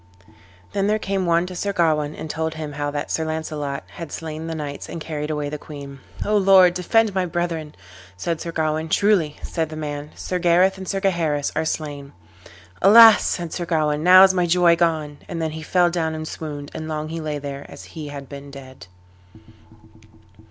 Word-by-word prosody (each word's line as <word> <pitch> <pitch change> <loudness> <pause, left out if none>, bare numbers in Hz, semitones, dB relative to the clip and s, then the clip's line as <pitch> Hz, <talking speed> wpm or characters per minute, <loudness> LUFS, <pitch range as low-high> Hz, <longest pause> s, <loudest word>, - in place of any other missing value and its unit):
Then 200 0 0
there 215 +1 +2
came 195 -3 -2
one 170 +1 +3
to 180 0 -8
Sir 200 +3 -2
Gawain 155 -4 +1
and - - -7
told 160 +1 -3
him 155 -2 -5
how 145 0 -2
that 145 0 -4
Sir 160 - 0
Launcelot 155 -3 -4
had 165 -3 -9
slain 160 0 -6
the 165 - -4
knights 145 -2 -6
and 170 - -6
carried 150 -1 -5
away 150 -1 -2
the 150 +1 -5
queen. 140 -2 -10 0.3
"O 210 - +1
Lord, 190 -2 +6
defend 210 +4 +2
my 185 -1 0
brethren!" 165 -3 -3 0.4
said 165 - -3
Sir 170 - -4
Gawain. 160 0 -1
"Truly," 185 -6 +2
said 160 -2 -2
the 155 - -7
man, 150 -1 -5
"Sir 180 - -3
Gareth 180 +2 +3
and 190 - -7
Sir 195 +1 -2
Gaheris 165 -7 0
are 160 - 0
slain." 145 -3 -4 0.7
"Alas!" 220 +2 +9
said 170 -3 -2
Sir 175 - -3
Gawain, 150 -3 +1
"now 185 +3 +8
is 190 -1 +6
my 180 -1 +1
joy 175 0 +4
gone." 155 -4 -1
And 170 - -5
then 160 -1 -2
he 160 +1 -7
fell 175 +2 +2
down 160 -2 -1
and 155 0 -5
swooned, 145 -3 -7
and 155 - -6
long 155 0 -4
he 165 0 -5
lay 150 -1 -3
there 140 -1 -7
as - - -11
he 155 -3 -7
had 140 -1 -8
been 140 +1 -10
dead. 130 -8 -12
160 Hz, 200 wpm, -22 LUFS, 150-180 Hz, 0.7 s, Alas